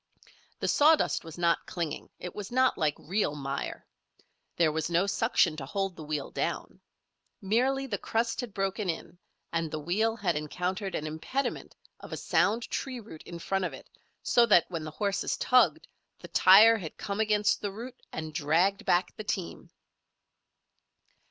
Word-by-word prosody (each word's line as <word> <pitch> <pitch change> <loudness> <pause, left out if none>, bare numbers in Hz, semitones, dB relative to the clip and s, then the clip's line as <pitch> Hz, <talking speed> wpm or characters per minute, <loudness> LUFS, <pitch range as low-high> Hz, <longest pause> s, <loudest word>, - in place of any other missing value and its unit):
The - - 0
sawdust 310 +2 +4
was 165 -1 -10
not 170 -1 +1
clinging, 160 -4 -4
it 180 - -7
was 205 0 -7
not 255 +1 +3
like 155 -3 0
real 185 -3 -1
mire. 140 -1 -4 0.7
There 165 -3 +3
was 160 +1 -2
no 170 +3 +2
suction 200 -5 +2
to 135 - -5
hold 195 +3 -2
the - - -10
wheel 150 -2 -3
down. - - -3 0.6
Merely 255 +7 +1
the 205 -7 -3
crust 230 +2 -1
had 245 -3 -6
broken 195 0 -2
in 170 +1 -5 0.3
and 165 -1 0
the 155 - -4
wheel 205 +9 0
had 185 -7 0
encountered 180 +6 -3
an 155 - -3
impediment 160 - -3 0.2
of - - -11
a - - -4
sound 225 +4 +1
tree 260 -2 -3
root 205 -8 -11
in 170 - -7
front 195 +3 -1
of - - -2
it - - -12 0.3
so 235 -1 +4
that, 175 -6 +6
when 165 -3 -4
the 155 - -5
horses 200 +5 -1
tugged, 255 +5 +3 0.3
the - - -12
tire 215 +5 +7
had 160 -5 -8
come 200 +1 -4
against 210 -1 +2
the 205 - -2
root 240 +5 -9
and 155 -1 -5
dragged 165 +6 +2
back 175 +1 +2
the 215 - -5
team. 195 -4 -4
190 Hz, 170 wpm, -29 LUFS, 160-220 Hz, 0.7 s, tire